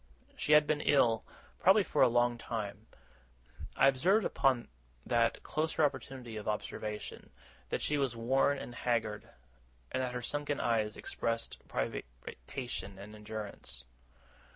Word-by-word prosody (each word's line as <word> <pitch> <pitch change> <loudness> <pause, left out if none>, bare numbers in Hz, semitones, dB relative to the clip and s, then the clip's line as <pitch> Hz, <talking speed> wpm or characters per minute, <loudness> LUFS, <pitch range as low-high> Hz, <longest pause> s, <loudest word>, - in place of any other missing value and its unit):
She 150 - +2
had 150 0 +8
been 150 0 +1
ill, 120 -7 +4 0.4
probably 195 +3 +6
for - - 0
a 130 - +8
long 120 0 +3
time. 110 -2 -5 0.9
I - - +6
observed, 180 +11 +4
upon 130 -3 +2 0.4
that 115 -1 +2
closer 155 0 0
opportunity 130 -4 -4
of 105 - -6
observation, 105 0 -4 0.4
that - - -1
she 150 -1 +1
was 135 -4 0
worn 135 +5 +2
and 120 - -7
haggard, 110 -4 -1 0.6
and 130 - 0
that 125 -1 -2
her 125 - -3
sunken 145 +2 -1
eyes 110 -3 +1
expressed 115 0 -2
privation 60 - -5
and 100 +2 -10
endurance. 105 - -6
120 Hz, 130 wpm, -33 LUFS, 110-135 Hz, 0.9 s, had